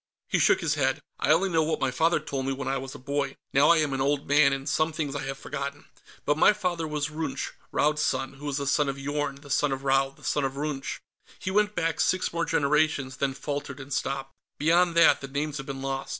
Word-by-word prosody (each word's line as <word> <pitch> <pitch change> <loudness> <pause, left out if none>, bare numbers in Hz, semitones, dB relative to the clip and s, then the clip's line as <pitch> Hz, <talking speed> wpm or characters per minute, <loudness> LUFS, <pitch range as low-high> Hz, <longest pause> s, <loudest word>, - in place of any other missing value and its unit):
He - - +2
shook - - +4
his 160 -4 +1
head. 135 -3 +1 0.2
"I - - 0
only 170 +5 +4
know 165 -2 +2
what 160 +1 0
my 135 - 0
father 165 +6 +2
told 135 -3 -4
me, 135 - 0
when 135 0 -5
I 135 0 0
was 135 +1 -7
a - - -6
boy. 140 +1 -2 0.2
Now 140 +2 +5
I 170 - +6
am 150 -3 +1
an 135 - -1
old 140 +1 0
man, 145 0 +5
and 135 0 -3
some 155 +2 +1
things 150 -3 -3
I - - -2
have 135 0 -4
forgotten. 140 +1 -5 0.4
But 145 +1 +1
my - - +7
father 180 -5 -2
was 150 0 -2
Runch, 155 +1 -3 0.2
Raud's 150 +1 +2
son, 135 -2 -1
who 140 +2 -8
was 145 -1 -1
the 140 - -2
son 140 +1 +2
of 135 - -3
Yorn, 145 0 -2
the 140 0 -12
son 145 0 +2
of 135 0 -3
Raud, 135 0 +1
the - - -19
son 145 - 0
of 135 -1 -1
Runch." 145 -2 -3 0.4
He 190 - -4
went 210 +1 +2
back 165 -1 -1
six 185 -2 +1
more 170 -1 0
generations, 145 -3 +1
then 135 -1 -1
faltered 140 0 -5
and 135 +1 -6
stopped. 135 -1 -2 0.2
"Beyond 170 +3 +3
that, 170 - +6
the 135 - -5
names 145 +2 -3
have 135 - -7
been 135 -1 -5
lost. 135 0 -3
145 Hz, 250 wpm, -27 LUFS, 135-155 Hz, 0.4 s, my